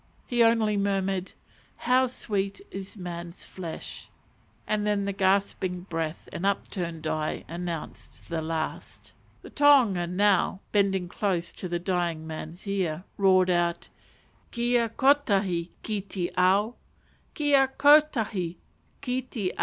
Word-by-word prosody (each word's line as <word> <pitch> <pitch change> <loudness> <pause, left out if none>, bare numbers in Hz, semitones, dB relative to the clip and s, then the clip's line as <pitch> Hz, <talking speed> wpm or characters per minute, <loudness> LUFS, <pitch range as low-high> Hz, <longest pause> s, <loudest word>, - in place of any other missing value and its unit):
He 240 -1 +1
only 225 -2 +4
murmured 195 -1 0 0.5
"How 255 +1 +3
sweet 200 -5 -3
is 195 +2 -7
man's 175 -1 -7
flesh," 170 -4 -8 0.6
and 215 -1 0
then 205 -1 +1
the 200 - -2
gasping 190 -2 +1
breath 165 -3 -4
and 170 - -5
upturned 175 -4 -2
eye 155 0 -2
announced 170 -1 -7
the 165 -1 -2
last 160 0 -5
moment. - - -33
The - - -10
tohunga 250 -12 +5
now, 190 +1 +2
bending 195 -3 +2
close 175 -2 -1
to 185 - -7
the 175 - 0
dying 175 -3 -1
man's 160 +4 -7
ear, 180 -4 -1
roared 185 -2 +4
out, 175 -1 0 0.6
"_Kia 240 -1 +1
kotahi 200 -10 +2
ki 210 -2 -2
te 185 -2 -4
ao! 195 +5 +3 0.6
Kia 285 -3 +4
kotahi 235 - +4 0.5
ki 250 0 -1
te 220 -7 -3
ao! - - -15
190 Hz, 130 wpm, -27 LUFS, 175-215 Hz, 0.6 s, tohunga